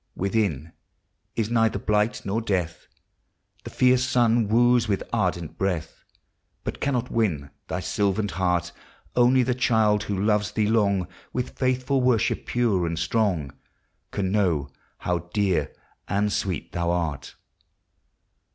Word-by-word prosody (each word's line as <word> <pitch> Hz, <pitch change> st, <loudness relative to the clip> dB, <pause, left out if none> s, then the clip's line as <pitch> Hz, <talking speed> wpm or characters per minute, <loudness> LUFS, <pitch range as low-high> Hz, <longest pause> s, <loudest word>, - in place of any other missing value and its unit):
201 -, -, -14 dB, 0.4 s
Within, 75 Hz, +5 st, -13 dB, 0.6 s
is 110 Hz, -2 st, -1 dB
neither 115 Hz, -1 st, +2 dB
blight 105 Hz, +2 st, 0 dB
nor 105 Hz, +4 st, -1 dB
death; 95 Hz, -7 st, -2 dB, 0.8 s
The -, -, -7 dB
fierce 130 Hz, 0 st, +3 dB
sun 120 Hz, -3 st, +2 dB
wooes 120 Hz, +1 st, +4 dB
with 100 Hz, -2 st, 0 dB
ardent 85 Hz, -3 st, -1 dB
breath, 90 Hz, -4 st, -2 dB, 0.6 s
But -, -, -5 dB
cannot 125 Hz, -3 st, -1 dB
win 80 Hz, -12 st, 0 dB, 0.2 s
thy 90 Hz, -, -3 dB
sylvan 100 Hz, +1 st, 0 dB
heart. 90 Hz, -3 st, 0 dB, 0.4 s
Only 125 Hz, +1 st, +5 dB
the 125 Hz, +1 st, +1 dB
child 110 Hz, -4 st, +2 dB
who 100 Hz, -, -2 dB
loves 105 Hz, 0 st, +1 dB
thee 110 Hz, -, +1 dB
long, 100 Hz, -5 st, +2 dB, 0.3 s
With 125 Hz, 0 st, -2 dB
faithful 130 Hz, +1 st, +1 dB
worship 125 Hz, -3 st, +1 dB
pure 110 Hz, -8 st, +1 dB
and 85 Hz, 0 st, -3 dB
strong, 85 Hz, -, 0 dB, 0.6 s
Can 95 Hz, -2 st, -2 dB
know 85 Hz, -9 st, +1 dB, 0.3 s
how 90 Hz, -1 st, -3 dB
dear 100 Hz, -4 st, +1 dB, 0.4 s
and 105 Hz, +1 st, 0 dB
sweet 90 Hz, -7 st, -2 dB
thou 85 Hz, 0 st, -1 dB
art. 85 Hz, -5 st, -2 dB
105 Hz, 135 wpm, -25 LUFS, 90-115 Hz, 0.8 s, Only